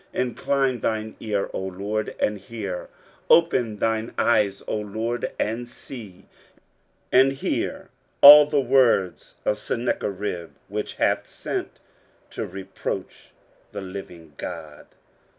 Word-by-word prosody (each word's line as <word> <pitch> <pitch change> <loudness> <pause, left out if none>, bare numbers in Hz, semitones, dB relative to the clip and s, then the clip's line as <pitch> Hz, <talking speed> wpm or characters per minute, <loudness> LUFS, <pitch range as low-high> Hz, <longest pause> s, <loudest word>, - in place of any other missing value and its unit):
23:037:017 - - +1
Incline 135 0 0
thine 110 0 -2
ear, 105 -3 -2
O - - -3
LORD, 100 +3 -3
and 105 0 +1
hear; 100 -3 -6 0.4
open 125 -10 +4
thine 110 +2 -1
eyes, 105 -4 +2
O - - -1
LORD, 110 +3 -3
and 120 +3 -2
see: 105 -8 -10 0.9
and 135 +1 +5
hear 135 - -3 0.3
all 150 +1 +11
the 150 -1 +2
words 125 -9 +2
of 105 - +1
Sennacherib, 100 -7 -3 0.2
which - - -4
hath - - +1
sent - - -5 0.5
to - - -4
reproach 95 +1 -6 0.4
the 100 - -5
living 90 -5 -9
God. 75 -1 -8
110 Hz, 115 wpm, -24 LUFS, 95-120 Hz, 0.9 s, all